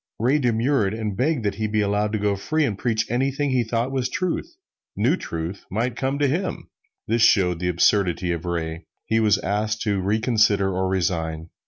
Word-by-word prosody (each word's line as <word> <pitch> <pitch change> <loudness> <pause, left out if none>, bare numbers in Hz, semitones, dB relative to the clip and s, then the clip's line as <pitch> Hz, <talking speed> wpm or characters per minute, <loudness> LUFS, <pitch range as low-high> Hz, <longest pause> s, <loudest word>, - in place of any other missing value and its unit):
Ray 130 +7 +2
demurred, 115 -3 +1
and 110 -3 -3
begged 130 +2 0
that 100 - +1
he 110 - +1
be 105 0 0
allowed 105 +1 0
to - - +1
go 105 -1 0
free 155 +10 0
and 110 - -1
preach 110 +1 0
anything 135 +4 0
he 125 -2 +2
thought 115 +3 -1
was 130 -2 -1
truth 185 - -3 0.4
new 120 - +2
truth 85 - -6
might 115 +5 -1
come 135 +1 -1
to 145 0 +2
him! 175 +7 -2 0.4
This 115 +1 +1
shows 90 -6 +4
the 90 0 -1
absurdity 90 0 +2
of 85 -1 -3
Ray. 85 -1 -3 0.2
He 115 - +1
was 105 -3 +4
asked 105 +2 -1
to 100 -3 0
reconsider 105 -1 +2
or 95 +1 0
resign. 80 -3 -2
110 Hz, 190 wpm, -23 LUFS, 95-125 Hz, 0.4 s, shows